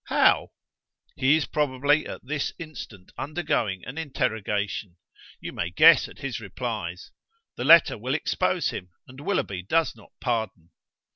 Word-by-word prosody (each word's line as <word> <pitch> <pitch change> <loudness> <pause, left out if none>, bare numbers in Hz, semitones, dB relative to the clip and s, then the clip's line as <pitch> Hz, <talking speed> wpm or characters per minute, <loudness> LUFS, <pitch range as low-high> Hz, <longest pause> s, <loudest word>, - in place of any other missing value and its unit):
"How?" - - +4 0.7
"He 135 +3 +4
is 160 - -1
probably 145 +1 +1
at - - -7
this 145 +1 -2
instant 130 - -9
undergoing 145 - -1
an 135 +6 -6
interrogation. 105 - -2 0.4
You - - -7
may 85 - -2
guess 155 - +6
at - - -15
his 135 -5 -4
replies. 105 -4 -5 0.4
The 120 - -4
letter 165 -6 +7
will 130 +5 -1
expose 160 - 0
him, 90 - -7 0.2
and 130 +1 -13
Willoughby 145 - -1
does 160 - +1
not - - -18
pardon." 110 - -3
125 Hz, 140 wpm, -26 LUFS, 100-150 Hz, 0.7 s, letter